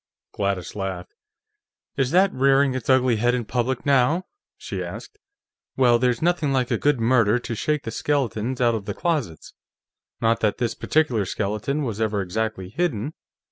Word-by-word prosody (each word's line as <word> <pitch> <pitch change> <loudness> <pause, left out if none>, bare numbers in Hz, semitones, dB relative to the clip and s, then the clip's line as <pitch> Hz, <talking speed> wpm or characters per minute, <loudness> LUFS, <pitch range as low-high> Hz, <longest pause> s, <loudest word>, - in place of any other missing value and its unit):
Gladys 100 -3 -2
laughed. 95 -3 -5 0.8
"Is 135 -2 +1
that 185 +5 +3
rearing 135 +1 +3
its 130 -2 -5
ugly 130 -3 +4
head 120 +3 +2
in 120 -2 -3
public, 125 +2 -2
now?" 140 +5 +3 0.3
she - - -5
asked. 420 - -9 0.6
"Well, 120 -3 +4
there's 125 +2 +1
nothing 170 -4 +1
like 130 -2 0
a - - +2
good 145 -3 +2
murder 115 -1 +3
to 120 -1 -5
shake 150 +6 -1
the 115 - -5
skeletons 130 -3 -1
out 120 -2 +3
of 110 -3 -3
the 105 -1 -4
closets. 145 - -2 0.7
Not 115 0 +2
that 105 -2 0
this 120 -2 -1
particular 130 -10 +1
skeleton 105 +10 -2
was 110 -4 -3
ever 105 -2 0
exactly 100 0 -3
hidden. 145 - -2
120 Hz, 165 wpm, -23 LUFS, 110-140 Hz, 0.8 s, ugly